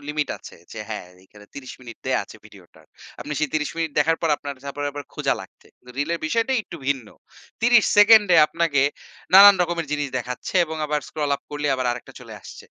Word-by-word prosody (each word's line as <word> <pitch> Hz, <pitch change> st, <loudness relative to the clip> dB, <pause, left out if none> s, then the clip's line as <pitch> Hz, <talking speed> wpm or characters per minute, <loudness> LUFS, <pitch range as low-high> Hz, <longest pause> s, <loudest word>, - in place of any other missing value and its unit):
Limit 150 Hz, -2 st, -2 dB
আছে -, -, -13 dB, 0.2 s
যে 110 Hz, -, -8 dB
হ্যাঁ, 105 Hz, -5 st, -6 dB, 0.2 s
এইখানে 105 Hz, +2 st, -18 dB
৩০ 130 Hz, -2 st, -9 dB
মিনিট 120 Hz, -3 st, -11 dB
দেয়া -, -, +1 dB
আছে -, -, -14 dB
ভিডিওটার। -, -, -18 dB, 0.4 s
আপনি 150 Hz, -, -6 dB
সেই 155 Hz, -, 0 dB
৩০ 150 Hz, -1 st, -1 dB
মিনিট 165 Hz, -1 st, -2 dB
দেখার 165 Hz, +2 st, +3 dB
পর 165 Hz, -, +1 dB
আপনার 140 Hz, -1 st, -7 dB
তারপর 140 Hz, +1 st, -6 dB
আবার 145 Hz, 0 st, -7 dB
খুঁজা -, -, 0 dB
লাগছে। -, -, -15 dB, 0.2 s
তো -, -, -19 dB
রিলের 165 Hz, +4 st, -1 dB
বিষয়টা 230 Hz, +9 st, 0 dB
একটু 170 Hz, -, -10 dB
ভিন্ন। 135 Hz, -6 st, -1 dB, 0.5 s
৩০ 235 Hz, -1 st, +5 dB
সেকেন্ডে 205 Hz, -3 st, +7 dB
আপনাকে 160 Hz, -4 st, 0 dB, 0.5 s
নানান 200 Hz, +1 st, +10 dB
রকমের 170 Hz, -2 st, -3 dB
জিনিস 145 Hz, -1 st, -2 dB
দেখাচ্ছে 125 Hz, +6 st, -7 dB
এবং 160 Hz, -1 st, -7 dB
আবার 150 Hz, 0 st, -1 dB
স্ক্রল 150 Hz, -2 st, -3 dB
আপ -, -, -30 dB
করলে 145 Hz, 0 st, -3 dB
আবার 130 Hz, -1 st, -2 dB
আরেকটা 125 Hz, -, -10 dB
চলে -, -, -11 dB
আসছে। -, -, -12 dB
150 Hz, 195 wpm, -22 LUFS, 140-170 Hz, 0.5 s, নানান